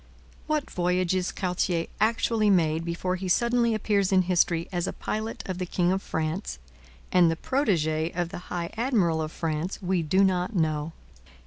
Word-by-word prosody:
What 305 -2 -1
voyages 180 0 0
Cartier 180 -2 -1
actually 220 -1 +2
made 165 -4 +2
before 175 +2 -2
he 185 +1 -5
suddenly 235 +3 +2
appears 200 -2 +1
in 185 -1 +4
history 170 -2 +1
as 175 0 -1
a - - -3
pilot 220 +1 -4
of 185 -1 -4
the 180 - -1
king 175 0 +1
of 190 +1 0
France 160 - -3 0.5
and 175 -2 +5
the 165 - 0
protege 160 - 0
of 175 -1 -1
the - - -6
high 170 -1 -3
admiral 215 -10 +1
of 155 0 -3
France 165 +3 -3
we 185 -2 0
do 185 +5 +3
not 185 +2 +1
know. 155 -2 0
180 Hz, 170 wpm, -26 LUFS, 165-200 Hz, 0.5 s, and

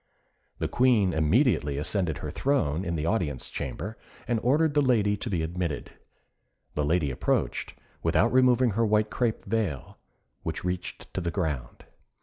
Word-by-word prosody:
The - - -1
Queen 115 -8 +3
immediately 80 - +2
ascended 80 +1 -1
her 75 - -5
throne 90 - 0
in 85 -2 -2
the 80 -1 -2
audience 80 - -1
chamber, 80 - -5 0.3
and 120 -2 +1
ordered 145 +5 +3
the 145 - +4
lady 110 -6 +3
to 115 - -4
be 85 -5 0
admitted. 85 -2 -3 0.8
The 75 - 0
lady 75 -1 +1
approached, 65 - -1 0.3
without 115 +6 +2
removing 125 -1 +4
her 115 +4 +1
white 105 0 +2
crape 120 -3 -1
veil, 95 -10 -2 0.4
which - - -4
reached 90 0 -4
to 95 - -2
the 85 - -1
ground. 75 -9 -3
95 Hz, 150 wpm, -27 LUFS, 80-115 Hz, 0.8 s, the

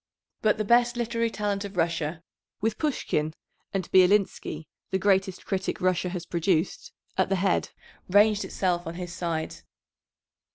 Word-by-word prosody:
But 215 0 +3
the 215 - -1
best 240 +2 +4
literary 230 -1 0
talent 205 -1 -2
of 200 -2 -8
Russia, 165 -1 -1 0.4
with 220 0 -1
Pushkin 155 - -1 0.4
and 190 -3 -2
Bielinsky, 185 -4 +3 0.2
the 190 - +1
greatest 190 -1 +1
critic 190 -1 -2
Russia 185 0 +1
has 175 -1 -5
produced, 170 -1 0 0.3
at 190 - +3
the 195 - +2
head, 190 0 +1 0.4
ranged 205 +2 +5
itself 175 -3 -1
on 165 - -5
his 175 -1 -6
side. 165 -3 -3
190 Hz, 140 wpm, -27 LUFS, 175-210 Hz, 0.4 s, ranged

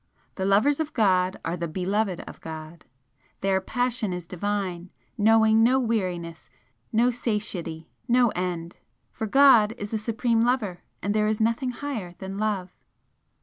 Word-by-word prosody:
The 190 - -3
lovers 215 +10 +3
of 310 -1 -2
God 185 -4 +2
are 165 - -1
the 170 -1 -3
beloved 190 +3 -1
of - - -11
God! 160 0 -9 0.6
their 190 -1 +1
passion 245 -1 -1
is 180 -1 -5
divine, 185 -1 -3 0.3
knowing 220 +1 +4
no 255 +3 +4
weariness, 180 -9 -2 0.4
no 240 +3 +3
satiety, 200 -9 -3 0.2
no 245 0 +4
end! 175 -3 -4 0.3
For 220 - -4
God 235 -3 +6
is 205 -2 -6
the 220 - -1
Supreme 230 +1 0
Lover 230 -7 0 0.2
and 205 +2 0
there 210 0 +2
is 215 0 0
nothing 230 +3 +1
higher 240 -9 -5
than 195 +1 -6
Love!" 200 -4 -2
205 Hz, 150 wpm, -25 LUFS, 180-230 Hz, 0.6 s, God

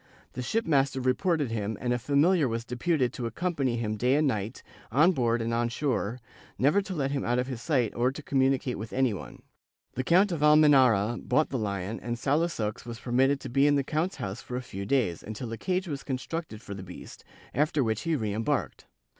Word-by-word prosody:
The 125 - -4
shipmaster 140 - +1
reported 140 +2 +1
him 110 -1 -2
and 120 0 0
a 120 - -1
familiar 145 +5 +3
was 115 0 -3
deputed 125 +2 0
to 120 -2 -3
accom 175 +10 -2
pany 130 -6 0
him 110 -2 -2
day 125 +5 +2
and 150 0 +3
night, 110 -1 -3 0.3
on 155 +9 +5
board 120 -6 +1
and 115 +1 -2
on 120 0 +1
shore, 125 -2 -1 0.4
never 150 +10 +3
to 195 -1 -6
let 140 -3 -1
him 140 -1 -1
out 120 +1 +1
of 125 - +1
his 130 -3 -6
sight 125 -8 +1
or 125 +2 +1
to 145 +3 -9
communicate 135 -3 +1
with 110 +1 -7
any 130 -3 +2
one. 100 - -9 0.5
The 130 - -2
Count 185 +7 +4
of 165 -4 -2
Almenara 135 -8 +5
bought 155 - +1
the 130 - -1
Hon 100 0 -3
and 120 +1 -3
Salusox 140 -5 -1
was 115 0 -7
permitted 130 +3 +2
to - - -6
be 135 +4 +3
in 145 - +4
the 140 - +2
count's 160 +7 -1
house 95 +1 -5
for 125 - -7
a 130 - -4
few 100 -5 -6
days, 110 -10 +1
until 110 +2 -6
a 115 - -4
cage 185 0 -1
was 145 -4 -4
constructed 130 -3 -5
for 100 - -7
the 95 - -7
beast, 90 -1 -11 0.3
after 150 -1 +1
which 110 -2 -1
he 165 -1 0
re 110 -7 -2
embarked. 110 +1 -2
130 Hz, 215 wpm, -28 LUFS, 115-145 Hz, 0.5 s, on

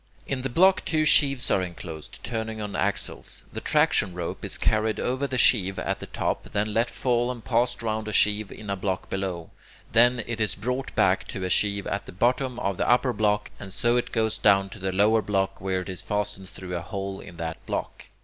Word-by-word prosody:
In 135 -2 -3
the 135 - -2
block 185 +8 +4
two 155 -1 +1
sheaves 140 -3 +6
are 95 - +3
enclosed, 85 -3 -8
turning 110 -2 -3
on 105 -2 -5
axles. 100 +1 -1
The - - -5
traction 90 - +2
rope 85 -2 -5
is - - -2
carried 110 0 +1
over 130 +3 -1
the 130 - -2
sheave 95 -6 +4
at - - -2
the - - -8
top, - - -2
then 105 +1 0
let 115 +2 +2
fall 120 -1 0
and 120 -3 -6
passed 120 -1 +1
round 110 -1 -2
a - - -2
sheave 105 -1 +2
in 105 -2 -7
a - - 0
block 95 -1 -3
below. 95 -4 -3 0.4
Then 120 0 +5
it 115 -2 -4
is 110 - 0
brought 125 +6 -3
back - - +2
to 95 - -5
a 90 - -1
sheave 100 +1 +1
at 100 - -3
the - - -9
bottom 125 +5 +1
of 100 -4 -1
the - - 0
upper 125 +1 +3
block, 105 -1 0
and 95 - -8
so 120 +5 +1
it 120 - -1
goes 110 -2 0
down 100 -1 +4
to 105 - -10
the 95 0 -2
lower 105 +4 +3
block, 95 -2 -1
where 95 -1 -1
it 90 - -8
is 90 - -5
fastened 105 -2 -3
through 90 -1 -7
a 85 - -2
hole 95 +2 -5
in 90 -2 -11
that 80 -1 -5
block. - - -4
105 Hz, 220 wpm, -26 LUFS, 95-120 Hz, 0.4 s, sheaves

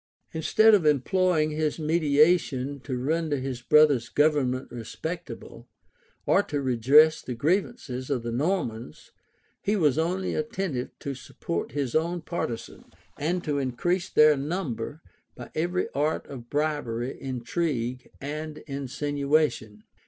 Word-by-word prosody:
Instead 215 +7 +4
of 200 -5 +5
employing 155 +2 +2
his 155 0 -1
mediation 150 -3 +2
to 130 -1 -4
render 155 +3 0
his 130 -2 -4
brother's 140 -3 +4
government 140 -3 +1
respectable, 160 +9 -7 0.6
or - - +4
to 145 - -3
redress 140 +5 +5
the 125 - -5
grievances 150 - -1
of 130 -5 -1
the 120 - -3
Normans, 120 - -2 0.5
he 205 - +1
was 155 -6 +2
only 180 +3 -1
attentive 195 - -2
to 140 - -5
support 120 -8 -5
his 140 -4 -2
own 170 +3 +1
partisans, 155 -8 -5 0.2
and 175 +4 -1
to 145 -2 -1
increase 175 +8 -1
their 150 0 +6
number 145 -2 -4 0.3
by - - -10
every 175 +3 0
art 150 +3 -1
of 120 -4 -10
bribery, 145 -5 -1
intrigue, 130 -1 -2
and 150 +2 -5
insinuation. 140 -4 -1
145 Hz, 125 wpm, -26 LUFS, 130-160 Hz, 0.6 s, their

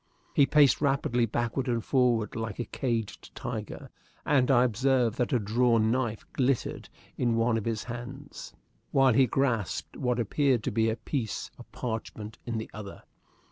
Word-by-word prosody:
He 140 - +5
paced 145 -4 +5
rapidly 135 -4 +1
backward 120 +4 -2
and 120 -2 -1
forward 120 -5 +2
like 110 -2 -4
a 120 - -3
caged 115 -5 -3
tiger, - - -6 0.3
and 135 -3 +3
I 125 -2 +5
observed 125 -1 +1
that 125 - +1
a 125 - +4
drawn 115 +1 +2
knife 120 -4 -1
glittered 130 -1 -1 0.3
in 120 -2 +2
one 115 0 +2
of 110 - -2
his 115 -2 -2
hands, 125 +4 -8 0.4
while 135 -2 +4
he 130 +2 +5
grasped 115 - -1
what 125 -1 -1
appeared 125 +1 +1
to - - -1
be 110 +1 +2
a 110 - 0
piece 115 0 -4
of - - -13
parchment 110 -2 -5
in 115 -1 -2
the 110 - -5
other. 105 -2 -9
120 Hz, 165 wpm, -28 LUFS, 110-130 Hz, 0.4 s, He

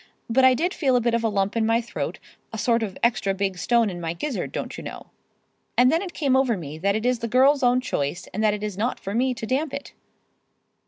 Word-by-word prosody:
But 260 +3 +3
I 260 -1 +6
did 350 +8 0
feel 265 -5 +1
a - - +5
bit 235 0 0
of 235 0 +1
a 225 - +2
lump 200 0 0
in 230 - +1
my 225 +1 +3
throat, 235 0 -4 0.3
a 225 - -5
sort 230 +1 +2
of 205 -4 -4
extra 210 -4 +2
big 195 -2 -2
stone 235 +4 +3
in 175 -3 -5
my 165 -1 -2
gizzard, 255 - -4
don't - - -5
you - - -8
know. - - -9 0.7
And 250 +1 +6
then 330 - +2
it 375 -3 -7
came 275 -4 +2
over 260 -5 +2
me 155 -2 -7
that 200 +3 +1
it 220 +2 -2
is 250 -1 +2
the 230 - -3
girl's 270 +5 +4
own 250 0 +3
choice, 145 - -2
and 215 +3 -1
that 210 -1 +3
it 210 - -7
is 205 -2 -4
not 240 +4 -1
for 195 - -5
me 255 +2 +1
to 225 - -5
damp 275 +4 -1
it." 280 - -8
230 Hz, 260 wpm, -24 LUFS, 200-255 Hz, 0.7 s, I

